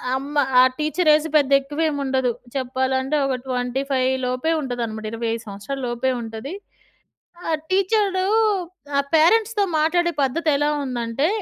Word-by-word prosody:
అమ్మ 275 +2 -5 0.3
ఆ - - +9 0.2
teacher 310 +2 +1
age 305 +1 +2
పెద్ద 285 -2 +3
ఎక్కువవేం 295 +3 -2
ఉండదు. 260 -2 +1 0.2
చెప్పాలంటే 260 +1 -1
ఒక 270 -1 0
25 260 +1 -1
లోపే 255 +6 -1
ఉంటదనమాట. 235 -5 -4
25 230 0 -3
సంవత్సరాల 205 +7 -6
లోపే 240 +2 -1
ఉంటది. 225 +6 -7 0.9
ఆ - - -1 0.2
టీచరు 385 0 +1 0.7
ఆ - - +6
పేరెంట్స్‌తో 415 +6 +4
మాట్లాడే 345 +3 +2
పద్ధతె‌లా 290 +1 +1 0.2
ఉందంటే, 245 +2 -1
270 Hz, 120 wpm, -22 LUFS, 250-315 Hz, 0.9 s, ఆ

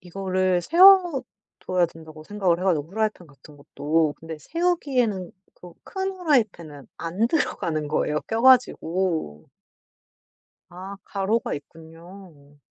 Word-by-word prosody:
이거를 185 0 -1
세워둬야 300 - +3
된다고 160 -1 -13
생각을 190 -3 0
해 - - -6
가지고. 160 -6 +1
프라이팬 215 -2 -2
같은 145 +1 -18
것도. 150 +2 -1
근데 160 -1 -8
세우기에는 260 - -1 0.2
그 180 -1 -14
큰 385 0 -4
프라이팬은 195 - -1
안 180 +7 -1
들어가는 160 - -2
거예요 150 0 -1
껴 225 +1 -2
가지고. 180 - +2 1.2
아 190 +3 -9
가로가 205 +3 -1
있군요. 165 0 -14
185 Hz, 275 characters per minute, -24 LUFS, 160-225 Hz, 1.2 s, 세워둬야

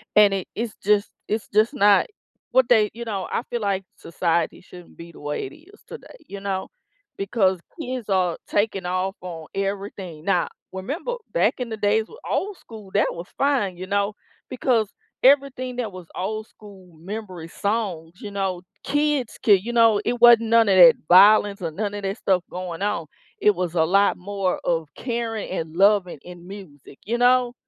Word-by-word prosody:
and 205 -2 +6
it 190 -2 -3
it's 230 -1 -4
just 205 0 +2 0.2
it's 215 0 -2
just 220 +6 +3
not 205 - +4 0.4
What 260 -2 +4
they 215 -3 +5
You 235 +1 -7
know, 200 -4 -3
I 235 - -1
feel 240 -2 -3
like 195 -1 -1
society 170 0 -1
shouldn't 180 -1 -15
be 170 0 -11
the - - -14
way 145 -1 -3
it - - -13
is 400 +7 -20
today, - - -11
you 200 0 -7
know? 195 -1 -3 0.5
Because 195 -2 +1 0.2
kids 255 -7 -5
are 185 -3 +1
taking 205 -3 0
off 185 +2 -1
on 165 -3 -8
everything. 195 -5 -4
Now, 180 -4 +2 0.2
remember 290 - -4 0.2
back - - +2
in 250 - -3
the 220 - -5
days 210 +1 +2
with 455 - -14
old 400 0 -1
school, 215 -4 -12
that 205 - +3
was 170 +2 -8
fine, 260 -10 +1
you 185 - -6
know, 200 +1 0 0.4
because 240 -4 +1 0.4
everything 260 -2 +3
that 225 -5 -3
was 180 -2 -11
old 215 +4 -3
school 190 -5 -16
memory 185 -2 -7
songs, 195 -7 -3
you 205 -2 -7
know, 190 -3 -2 0.2
kids 290 -4 0
could, 200 -3 +5
you 240 - -4
know 225 -3 +4
It 240 0 -1
wasn't 230 -2 +7
none 230 -2 +5
of 190 - +4
that 170 -2 +9
violence, 200 +2 +6
or 165 - -2
none 205 +4 -3
of 205 -1 -6
that 195 +3 -2
stuff 185 -2 +1
going 180 -1 -6
on, 205 -6 -1 0.3
it 210 - +4
was 180 -1 -3
a 160 - +4
lot 200 +4 +3
more 195 0 -2
of 165 -3 0
caring 230 -3 -3
and 165 -3 -4
loving 195 -5 +3
in 175 0 -12
music, 165 -9 -12
you 235 +3 -1
know? 245 0 +3
200 Hz, 185 wpm, -23 LUFS, 180-225 Hz, 0.5 s, that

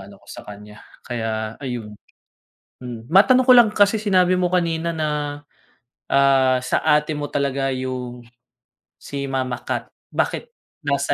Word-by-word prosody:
ano 100 +1 -13
ko - - -24
sa - - -9
kanya, 105 +1 -11 0.3
kaya 110 -2 -3
ayun. 120 -6 -5 0.9
Mm. 120 +1 -9
Matanong 250 +8 +6
ko - - +8
lang 235 -3 +7
kasi 205 +1 +4
sinabi 185 -3 +3
mo 180 - +2
kanina 170 -2 0
na, 150 -2 -2 0.7
ah, 135 -2 +4
sa - - 0
ate 150 0 +2
mo 145 0 -3
talaga 140 -1 -1
'yung 125 -1 -5 0.8
si 140 -1 -6
mama 130 -2 -2
cat, - - -3 0.3
bakit 475 - -1 0.3
nasa - - 0
140 Hz, 140 wpm, -21 LUFS, 125-170 Hz, 0.9 s, ko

